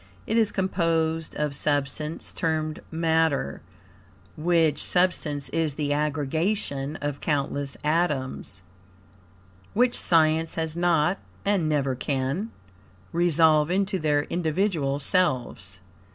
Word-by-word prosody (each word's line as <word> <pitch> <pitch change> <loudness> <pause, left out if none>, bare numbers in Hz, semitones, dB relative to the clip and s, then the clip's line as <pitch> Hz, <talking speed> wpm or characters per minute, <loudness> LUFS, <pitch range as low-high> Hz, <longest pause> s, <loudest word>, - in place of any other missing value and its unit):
It 220 - -1
is 225 -2 +3
composed 165 -4 0
of 150 -1 -1
substance 145 +2 -1
termed 155 -2 -2
matter, 160 - 0 0.7
which 160 -2 +2
substance 165 -6 +1
is 160 -4 -1
the 145 -1 -1
aggregation 150 0 -1
of 145 -1 -3
countless 140 -2 -1
atoms, 145 - -1 1.1
which 245 +2 +3
science 160 -1 +3
has 160 -1 -2
not, 175 +1 +2 0.3
and 195 -6 +1
never 140 -3 +1
can, 135 - -2 0.6
resolve 160 -2 +3
into 195 +1 0
their 150 -2 +1
individual 160 -4 0
selves. 130 - 0
155 Hz, 100 wpm, -25 LUFS, 145-175 Hz, 1.1 s, is